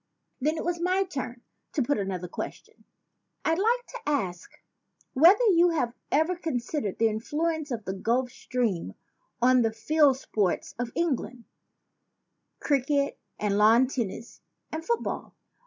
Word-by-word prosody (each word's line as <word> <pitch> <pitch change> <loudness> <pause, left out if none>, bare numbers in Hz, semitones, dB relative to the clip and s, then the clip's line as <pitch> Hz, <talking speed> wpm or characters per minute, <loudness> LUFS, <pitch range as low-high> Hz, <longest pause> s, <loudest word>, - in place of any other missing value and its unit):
Then 305 +4 0
it - - -4
was 345 0 -1
my 370 +2 +2
turn 260 -9 -6 0.3
to 285 - +1
put 285 -1 0
another 185 -3 -3
question. - - -8 0.6
"I'd 325 +2 +2
like 480 +4 +2
to - - -7
ask 185 -12 -2 0.6
whether 350 - +6
you 350 0 +5
have 250 -8 0 0.2
ever 315 +5 +2
con 330 -5 -3
sidered 240 -4 -2
the 225 - +4
influence 300 +8 -2
of 230 -5 -4
the 190 - -2
Gulf 240 +6 0
Stream 235 -11 -2 0.5
on 255 0 +6
the 225 -1 +2
field 280 +4 +3
sports 205 -8 -1
of 240 -1 -2
England, 265 -7 -2 1.1
cricket 280 0 +1 0.2
and 205 -1 0
lawn 225 +4 +6
tennis 235 -3 -5 0.3
and 320 +1 -4
football? 470 +6 -2
260 Hz, 140 wpm, -27 LUFS, 225-320 Hz, 1.1 s, whether